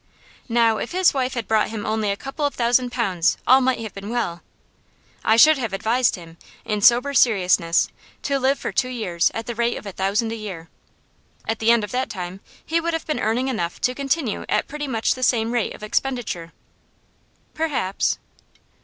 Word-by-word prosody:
Now 230 -2 +3
if 245 - -5
his 370 0 +4
wife 260 -2 -1
had 235 -3 -3
brought 220 -1 +2
him 220 -2 -5
only 215 -1 0
a 200 - -1
couple 270 +5 -6
of 285 - 0
thousand 245 +1 +2
pounds 190 -9 +1
all 260 +2 +6
might 260 -1 +2
have 220 -2 -6
been 200 +1 -8
well. 175 -8 -2 0.8
I 220 - +4
should 305 +4 +7
have 225 -6 -3
advised 235 +5 +1
him, 170 -3 -12 0.3
in 210 -2 -2
sober 245 +5 +5
seriousness, 185 -9 +3 0.4
to 280 -1 0
live 270 +2 +2
for - - -4
two 255 - 0
years 185 -9 0
at 225 - -4
the 240 - -4
rate 235 +1 0
of - - -10
a 200 - -5
thousand 200 +5 0
a - - -3
year. 190 -7 -7 0.8
At 225 - -1
the 225 - +2
end 235 -2 +5
of 210 - -5
that 255 +1 -1
time 185 -2 -6 0.3
he 330 +1 0
would 335 0 -1
have 325 - -4
been 305 - -2
earning 230 +4 0
enough 175 -10 -3
to 250 - +1
continue 275 -3 -1
at - - +1
pretty 295 0 -5
much 230 -4 +1
the 255 - -9
same 230 -2 +2
rate 240 -3 -1
of - - -14
expenditure.' 215 -7 -2 1.0
'Perhaps. 285 -12 -1
230 Hz, 195 wpm, -22 LUFS, 205-260 Hz, 1.0 s, should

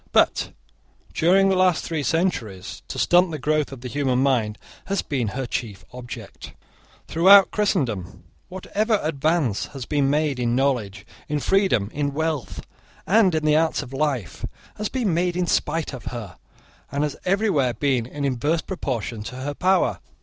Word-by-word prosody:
But, - - +3 0.6
during 195 +4 +4
the 190 - +3
last 185 -2 +3
three 160 -3 -2
centuries, 135 - -2
to - - -6
stunt 175 +1 +4
the 155 - -4
growth 150 +1 0
of 135 -3 -9
the 125 - -5
human 135 -1 0
mind 125 -6 +1 0.3
has 195 -1 -1
been 130 -6 -2
her 130 +6 -3
chief 115 -5 -5
object. 125 -1 -9 0.5
Throughout 190 +4 +7
Christendom, 135 - -1 0.3
whatever 210 +4 -1
advance 155 - 0
has 130 - -5
been 145 -2 +1
made 145 -2 +1
in 120 -1 +1
knowledge, 115 -7 -1 0.2
in 150 0 0
freedom, 145 - +2
in 145 -1 -2
wealth, 160 -4 -3 0.4
and 195 -3 +4
in 155 -1 -1
the 150 0 +4
arts 160 -1 +1
of 135 -1 -11
life, 135 - -2 0.3
has 210 0 -3
been 235 -9 0
made 175 +1 0
in 180 - +1
spite 165 -3 0
of 130 - -8
her, 110 -7 -7 0.5
and 140 +1 0
has 150 -2 -2
everywhere 185 - +1
been 130 -5 0
in 145 +2 -4
inverse 145 +5 0
proportion 120 - -4
to 125 - -7
her 135 +3 -4
power. 185 +5 +2
145 Hz, 165 wpm, -23 LUFS, 125-175 Hz, 0.6 s, Throughout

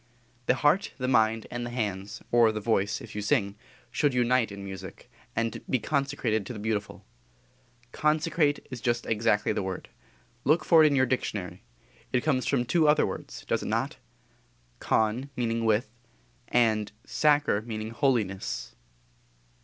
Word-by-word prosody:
The - - +4
heart, 155 +8 +2
the 130 -2 -2
mind, 110 -3 +3
and 120 0 -3
the 120 - -4
hands, 105 -5 -4
or 120 -2 +5
the 110 - -3
voice, 100 -2 0
if - - -10
you 105 - -3
sing, 100 -1 +1 0.4
should 145 -4 +1
unite 125 -2 +2
in 100 - -8
our - - -7
music; 95 -1 -9 0.2
and 115 0 -1
be 130 - +3
consecrated 135 -4 -1
to - - -5
the - - -7
beautiful. 105 -1 -3 0.9
Consecrate 155 0 +1
is 125 -3 -6
just 120 0 0
exactly 105 -1 +1
the - - -1
word. 95 -1 -5 0.5
Look 155 +3 +3
for 165 -2 +7
it - - +7
in 145 - +2
your 130 -1 +4
dictionary. 100 -8 -3 0.5
It 125 - +2
comes 130 -5 +1
from 125 -3 +1
two 155 +6 +3
other 150 0 +5
words, - - -7
does - - 0
it - - -5
not? - - -1 0.8
Con 110 +5 +1
meaning 115 -1 -1
with 110 +3 +2 0.6
and 110 -3 +2
sacer 145 -8 +2
meaning 110 -1 -5
_holiness. 115 -8 -1
120 Hz, 160 wpm, -28 LUFS, 105-135 Hz, 0.9 s, for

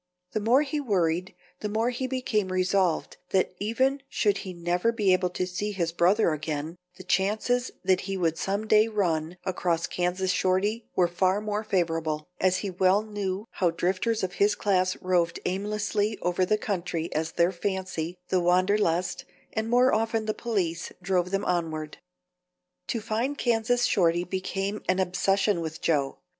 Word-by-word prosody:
The - - -1
more 240 +7 +4
he 295 +1 -2
worried 180 - 0 0.2
the 210 - -3
more 225 +4 +1
he 255 +1 -3
became 230 -7 -1
resolved 185 -2 +1
that 185 -1 +1
even 260 +7 +1
should 205 -2 +1
he 190 - -6
never 175 +5 0
be 205 -5 +2
able 185 0 +2
to 180 +1 -2
see 185 +4 -3
his 170 -4 -1
brother 175 +1 +3
again, 155 +1 -4 0.2
the 185 - -10
chances 215 +7 +1 0.2
that 185 0 +3
he 195 0 -3
would 165 -3 +1
some 200 +5 -2
day 215 0 +5
run 175 -6 -1
across 175 -2 0
Kansas 180 +2 -1
Shorty 190 +5 0
were 180 - +4
far 185 +3 +1
more 210 0 -2
favorable, 165 -6 -1
as 185 0 +3
he 195 - -2
well 185 +3 +3
knew 205 -2 -3
how 180 - +1
drifters 185 +6 0
of 185 -1 -2
his 205 +1 +4
class 185 -2 +1
roved 175 -2 +1
aimlessly 210 +2 -1
over 180 +1 +1
the 215 - +3
country 175 -5 -3
as 160 +1 -2
their 170 +2 +3
fancy, 180 -2 -3
the 185 - +3
wanderlust, 180 0 +2 0.3
and 220 0 -2
more 250 +2 +4
often 225 0 0
the 215 - 0
police 185 -9 -2
drove 180 -1 +1
them 195 +1 -1
onward. 160 -3 -2 0.9
To 225 +4 -2
find 230 +6 -1
Kansas 240 0 +2
Shorty 175 -3 +2
became 195 +3 -3
an 185 - +3
obsession 190 +1 +1
with 160 0 -5
Joe. 145 -4 0
190 Hz, 165 wpm, -27 LUFS, 175-215 Hz, 0.9 s, day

